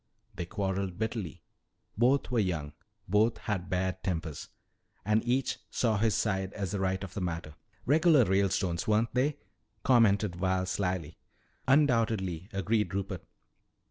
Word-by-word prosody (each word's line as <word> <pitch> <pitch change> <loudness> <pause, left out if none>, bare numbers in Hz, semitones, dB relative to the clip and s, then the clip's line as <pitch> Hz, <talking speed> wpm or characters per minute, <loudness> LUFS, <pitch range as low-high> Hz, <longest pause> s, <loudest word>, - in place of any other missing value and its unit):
They 85 - -4
quarreled 95 -1 -2
bitterly. 110 - -4 0.5
Both 125 +4 +2
were 120 - +2
young, 80 -8 -1 0.3
both 105 +5 +3
had 95 -4 -3
bad 95 0 -1
tempers, 80 -6 -3 0.6
and 105 +1 +2
each 125 +2 0
saw 110 -4 +1
his 110 -2 +2
side 95 -3 0
as 100 -3 -3
the 100 - -2
right 95 0 0
of 95 - -7
the 100 - -4
matter 85 -3 -4 0.2
" - - -33
"Regular 150 -1 +5
Ralestones, 95 -3 +1
weren't 110 +2 +2
they?" 135 +4 +1 0.5
commented 105 -7 +4
Val 95 0 0
slyly. 90 -4 -2 0.5
"Undoubtedly," 110 - +2
agreed 105 +1 0
Rupert. 95 -2 -3
100 Hz, 140 wpm, -30 LUFS, 90-115 Hz, 0.6 s, Regular